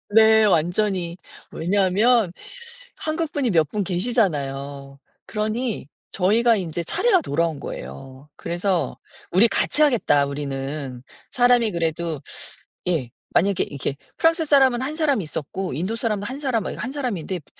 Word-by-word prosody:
네. 220 Hz, +1 st, +6 dB
완전히. 180 Hz, -1 st, +1 dB, 0.3 s
왜냐하면 200 Hz, +3 st, +2 dB, 0.6 s
한국 315 Hz, 0 st, -2 dB
분이 265 Hz, -5 st, 0 dB
몇 160 Hz, -5 st, +3 dB
분 210 Hz, +3 st, -1 dB
계시잖아요. 145 Hz, -, -1 dB, 0.3 s
그러니 220 Hz, -, -2 dB, 0.2 s
저희가 225 Hz, +5 st, +3 dB
인제 170 Hz, -4 st, -3 dB
차례가 380 Hz, -, +3 dB
돌아온 165 Hz, -, -1 dB
거예요. 130 Hz, -, -9 dB
그래서 175 Hz, +1 st, -1 dB, 0.3 s
우리 195 Hz, +6 st, +5 dB
같이 295 Hz, -, 0 dB
하겠다 230 Hz, -, +4 dB
우리는. 140 Hz, -2 st, -5 dB, 0.3 s
사람이 245 Hz, -3 st, +4 dB
그래도 165 Hz, -2 st, -2 dB, 0.7 s
예 155 Hz, -9 st, 0 dB, 0.2 s
만약에 195 Hz, +2 st, +3 dB
이게 140 Hz, -1 st, -4 dB, 0.2 s
프랑스 325 Hz, 0 st, +3 dB
사람은 265 Hz, -4 st, +4 dB
한 285 Hz, +4 st, -3 dB
사람 295 Hz, -8 st, +1 dB
있었고 165 Hz, +3 st, -4 dB
인도 185 Hz, -, -2 dB
사람은 215 Hz, -3 st, -1 dB
한 260 Hz, +7 st, -5 dB
사람 255 Hz, -7 st, 0 dB
막 -, -, -4 dB
이거 -, -, -6 dB
한 250 Hz, -, -3 dB
사람인데 205 Hz, -, -3 dB
프 150 Hz, -, -23 dB
190 Hz, 305 characters per minute, -23 LUFS, 155-240 Hz, 0.7 s, 네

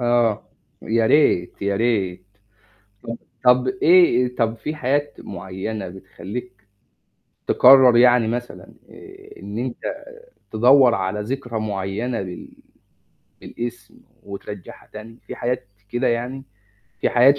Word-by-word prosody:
آه، 120 Hz, -3 st, +1 dB, 0.4 s
يا 115 Hz, 0 st, +1 dB
ريت 100 Hz, -, +2 dB
يا 100 Hz, 0 st, 0 dB
ريت 95 Hz, -5 st, -1 dB, 0.8 s
ط -, -, -16 dB, 0.4 s
طب 125 Hz, +1 st, +5 dB
إيه، 130 Hz, -3 st, +4 dB
طب 115 Hz, -1 st, 0 dB
في 150 Hz, +6 st, -5 dB
حياة 145 Hz, +1 st, -1 dB
معينة 95 Hz, +2 st, -6 dB
بتخلِّيك 100 Hz, +3 st, -9 dB, 0.8 s
تقرر 130 Hz, -2 st, +7 dB
يعني 120 Hz, -2 st, +5 dB
مثلًا 120 Hz, +1 st, -6 dB, 0.2 s
آآ -, -, -14 dB
إن 100 Hz, +3 st, -6 dB
أنت 130 Hz, -, -5 dB, 0.5 s
تدوَّر 125 Hz, +2 st, +5 dB
على 95 Hz, +1 st, -2 dB
ذكرى 120 Hz, 0 st, -4 dB
معيّنة 105 Hz, +3 st, -3 dB
بال 90 Hz, -2 st, -8 dB, 0.9 s
بالاسم، 120 Hz, -2 st, -7 dB, 0.3 s
وترجعَّها 100 Hz, -1 st, -10 dB
تاني؟ 115 Hz, +2 st, -11 dB
في -, -, -7 dB
حاجات 120 Hz, -4 st, -3 dB, 0.2 s
كده 120 Hz, +3 st, 0 dB
يعني 125 Hz, +3 st, -3 dB, 0.6 s
في -, -, +1 dB
حاجات 135 Hz, +4 st, +5 dB
120 Hz, 115 wpm, -21 LUFS, 100-125 Hz, 0.9 s, تقرر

